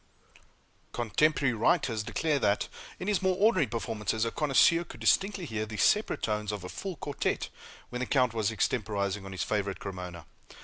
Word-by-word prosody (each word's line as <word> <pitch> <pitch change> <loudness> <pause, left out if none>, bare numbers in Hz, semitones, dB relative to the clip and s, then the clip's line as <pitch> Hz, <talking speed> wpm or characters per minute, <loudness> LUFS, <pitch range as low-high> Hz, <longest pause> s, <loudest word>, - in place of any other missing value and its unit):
Cotemporary 130 +4 +2
writers 115 0 +2
declare 150 +7 0
that, 100 -4 +1 0.3
in 185 - -5
his 205 -3 +1
more 190 -1 +2
ordinary 195 - +4
performances, 110 0 -2
a 115 - -1
connoisseur 155 +3 +4
could - - -12
distinctly 195 -2 +2
hear 110 -5 -3
the 105 0 -6
separate 210 - +2
tones 105 -1 -1
of 105 -3 -5
a 90 - -6
full 190 - -5
quartet 145 -2 -2 0.4
when 125 - -3
the 125 - -2
count 125 -4 +2
was 110 -3 +1
extemporizing 105 -3 -1
on 95 - -7
his 95 -5 -2
favorite 100 -2 -1
Cremona. 90 -3 -7
115 Hz, 170 wpm, -29 LUFS, 105-155 Hz, 0.4 s, ordinary